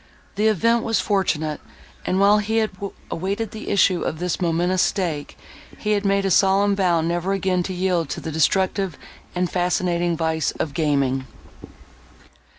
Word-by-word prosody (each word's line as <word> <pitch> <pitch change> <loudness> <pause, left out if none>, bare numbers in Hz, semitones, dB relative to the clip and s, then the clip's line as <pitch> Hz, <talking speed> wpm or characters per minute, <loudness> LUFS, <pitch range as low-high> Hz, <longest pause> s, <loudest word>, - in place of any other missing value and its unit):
The 210 +2 +1
event 230 +3 +2
was 225 -2 +1
fortunate, 160 -7 0 0.5
and, 185 - +1
while 205 +1 +5
he 220 +2 -1
had 220 -1 +1 0.4
awaited 200 +5 -2
the 220 - -7
issue 185 -3 +3
of 155 - -2
this 180 +2 -2
momentous 175 +2 +1
stake, 170 -7 -2 0.4
he 210 -1 0
made 200 -1 +1
a 195 - +1
solemn 195 +2 +4
vow 180 -4 +2
never 175 +3 -1
again 190 -2 0
to 185 +2 -4
yield 180 -4 0
to - - -4
the 160 - -5
destructive 185 +2 +1 0.4
and 180 0 +1
fascinating 175 -1 0
vice 160 -1 0
of 150 - -4
gaming. 140 -4 0
185 Hz, 155 wpm, -22 LUFS, 165-200 Hz, 0.5 s, while